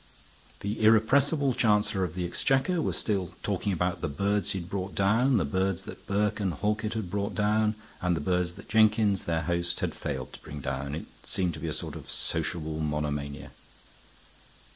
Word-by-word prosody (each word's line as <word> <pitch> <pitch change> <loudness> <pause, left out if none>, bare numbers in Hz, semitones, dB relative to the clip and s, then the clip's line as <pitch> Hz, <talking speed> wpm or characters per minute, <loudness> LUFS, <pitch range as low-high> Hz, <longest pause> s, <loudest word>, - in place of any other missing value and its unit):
The 105 +2 -2
irrepressible 135 +6 +4
Chancellor 105 -4 +2
of 85 -2 -3
the 90 -1 -1
Exchequer 135 - +1
was - - 0
still 95 -5 -1
talking 100 - 0
about 90 0 0
the - - 0
birds 100 +8 0
he 95 -2 -1
had 85 - -7
brought 95 0 -4
down, 115 +6 +4
the 95 - +2
birds 95 +4 0
that - - -10
Burke 105 +1 +1
and 95 -4 0
Halkett 105 +4 0
had 100 -6 -3
brought 100 +1 -1
down, 105 +1 +2 0.3
and 90 -1 +2
the - - -1
birds 90 +2 0
that - - -12
Jenkins, 110 -2 +4
their 85 -1 0
host, 85 +1 -1
had - - -1
failed 65 -4 -4
to - - -11
bring 75 -1 -7
down. 65 +2 -3
It 80 - -5 0.2
seemed 90 -3 -1
to - - -7
be 80 - -4
a - - -1
sort - - -4
of - - -9
sociable 80 -2 -2
monomania. 75 -2 -2
95 Hz, 185 wpm, -28 LUFS, 80-105 Hz, 0.3 s, irrepressible